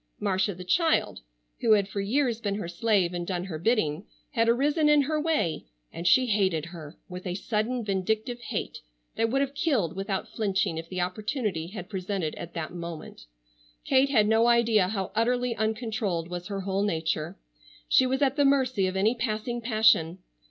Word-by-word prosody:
Marcia 190 0 0
the 180 - -8
child, 330 - +1 0.4
who 225 - +4
had 200 -2 +3
for 200 0 -3
years 235 +2 0
been 200 -2 -1
her 205 -4 -4
slave 180 0 +1
and 175 -1 -4
done 180 -2 -2
her 170 -5 -6
bidding, 180 -5 +1 0.3
had 230 -4 +2
arisen 295 +6 +3
in 295 -1 +5
her 305 +2 -1
way, 300 - 0 0.3
and 170 +1 -3
she 255 +9 +5
hated 190 -8 +1
her 165 -4 -10
with 180 +1 -7
a 180 - -2
sudden 220 +4 -2
vindictive 220 +5 -1
hate - - -4 0.4
that 225 0 +1
would 270 +3 +1
have 275 0 -1
killed 260 - 0
without 195 0 -3
flinching 190 -6 -1
if 165 0 -9
the 185 - -4
opportunity 190 - -2
had 185 -1 -8
presented 190 -4 -3
at 170 +1 -9
that 165 0 -4
moment. 170 - -8 0.6
Kate 265 +1 +3
had 215 -6 +4
no 225 +2 +4
idea 230 -5 +4
how 195 -2 -3
utterly 245 +2 +1
uncontrolled 220 -6 -2
was 175 0 -5
her 200 -1 -4
whole 195 +1 -1
nature. 160 -5 -1 0.5
She 260 - +4
was 265 +2 0
at 275 +1 +1
the 285 - +4
mercy 260 -8 +2
of 185 - -3
any 205 +4 +3
passing 235 0 -3
passion. 215 -7 +3
210 Hz, 180 wpm, -27 LUFS, 180-240 Hz, 0.6 s, in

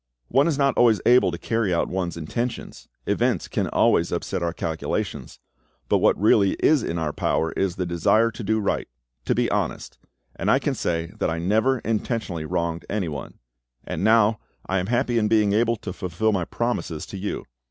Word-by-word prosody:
One 135 +5 +3
is 155 -4 0
not 140 -1 +2
always 115 -4 +5
able 125 +1 +5
to - - -5
carry 115 -4 -1
out 85 - +1
one's 90 -2 -3
intentions; 115 +10 -4 0.2
events - - 0
can - - -1
always 85 - +2
upset 85 +1 -2
our 85 -1 0
calculations; 80 -1 -4 0.5
but - - +3
what - - +3
really 100 -1 +4
is 155 -3 +3
in 85 - -3
our 80 -3 -2
power 80 - 0
is 95 -2 -1
the 90 - -2
desire 110 +7 +2
to 115 - -8
do 110 +2 +1
right—to - - -3
be - - +1
honest; - - -3 0.4
and - - -2
I - - +5
can - - -1
say 85 0 -2
that - - +1
I 80 - -2
never 110 +10 +2
intentionally 110 -7 -2
wronged 85 0 -2
anyone. 85 -9 -4 0.5
And - - -4
now. 110 -1 +4 0.3
I 95 0 0
am 90 - -3
happy 120 0 +1
in 105 - +1
being 105 -2 +3
able 115 +2 +2
to 90 - -6
fulfil 95 +3 -1
my 95 -4 0
promises 115 -10 -3
to 100 - -8
you. 100 - -4
100 Hz, 185 wpm, -24 LUFS, 85-115 Hz, 0.5 s, always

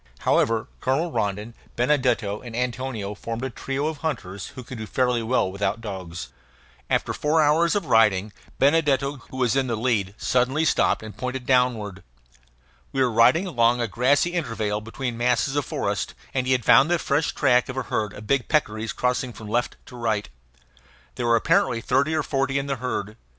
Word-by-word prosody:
However, 115 -1 +2
Colonel 150 +7 0
Rondon, 105 +1 -2 0.2
Benedetto, 120 -6 +1
and 120 -3 -8
Antonio 125 -4 -3
formed 115 +3 -5
a 130 - -3
trio 135 +4 -3
of 155 -1 -2
hunters 115 - -4
who 130 - -10
could 125 0 -8
do 110 - -5
fairly 125 -1 +1
well 115 -4 +1
without 100 +2 -1
dogs. 90 - -6 0.6
After - - 0
four 155 +2 +1
hours 160 +4 +3
of 205 - 0
riding, 105 -4 +3 0.2
Benedetto, 140 -1 +2
who 130 - -8
was 125 -1 +1
in 135 -1 +1
the 115 - -1
lead, 110 -4 0
suddenly 130 +5 +1
stopped 150 - +2
and 110 -1 -9
pointed 125 0 -4
downward. 120 -7 +1 0.9
We 135 - -3
were 125 - +1
riding 125 - +4
along 120 -8 +2
a 120 - 0
grassy 130 - +2
intervale 115 -11 -2
between 115 +2 -5
masses 125 +2 +1
of 145 - 0
forest, - - -2 0.2
and 130 -1 -1
he 130 - +3
had 125 -3 0
found 145 - +6
the 175 - +3
fresh 150 -1 0
track 125 -3 +3
of 130 - -5
a 130 - -1
herd 105 -3 -2
of 105 - -10
big 135 +2 +1
peccaries 110 -7 0
crossing 125 0 -1
from 105 0 -9
left 120 +2 0
to 125 - -12
right. 110 -4 -1 0.8
There 120 - -3
were 115 - +5
apparently 115 +1 +2
thirty 140 +6 +1
or 155 - +1
forty 135 -1 0
in 140 - -1
the 140 -1 -2
herd. 110 -3 -4
125 Hz, 185 wpm, -24 LUFS, 110-135 Hz, 0.9 s, found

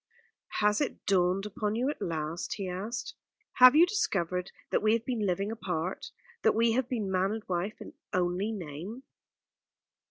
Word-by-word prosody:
"Has 210 +3 +3
it 290 - -3
dawned 185 0 +2
upon 210 0 -2
you 245 +3 0
at - - -10
last?" 160 +1 -3
he 195 -2 -4
asked. 195 +6 -4 0.5
"Have 255 +2 +10
you 330 +3 +8
discovered 180 - -1 0.2
that - - +2
we 215 0 +4
have 230 0 0
been 230 -5 -1
living 195 +3 0
apart; 185 -5 -3 0.3
that - - +3
we 230 +1 +4
have 255 +1 0
been 215 -6 -2
man 190 +2 +1
and 220 -1 -5
wife 185 +3 -2 0.3
only 180 +3 0
in 220 - -3
name?" 180 - -7
200 Hz, 165 wpm, -30 LUFS, 180-225 Hz, 0.5 s, Have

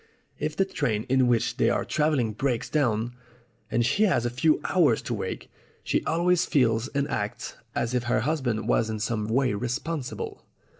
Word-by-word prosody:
If 150 0 -2
the 195 - +2
train 125 - -1
in 130 -1 +4
which 120 -2 +1
they - - +3
are - - 0
travelling 145 -8 +1
breaks 120 +1 -1
down, 120 -5 +1 0.6
and 120 0 +1
she 200 - +1
has 170 - +2
a 120 - 0
few 150 +6 +2
hours 155 - +3
to - - -3
wait, - - -4 0.4
she - - 0
always 175 +2 +2
feels 120 -7 +2
and 140 0 -1
acts 115 +2 -3 0.2
as 120 +1 -1
if 125 -1 0
her 120 -1 +1
husband 125 -5 -1
was 110 - +2
in 110 - -2
some 110 0 -1
way 125 +1 +2
responsible." 125 +6 -4
125 Hz, 180 wpm, -26 LUFS, 115-150 Hz, 0.6 s, in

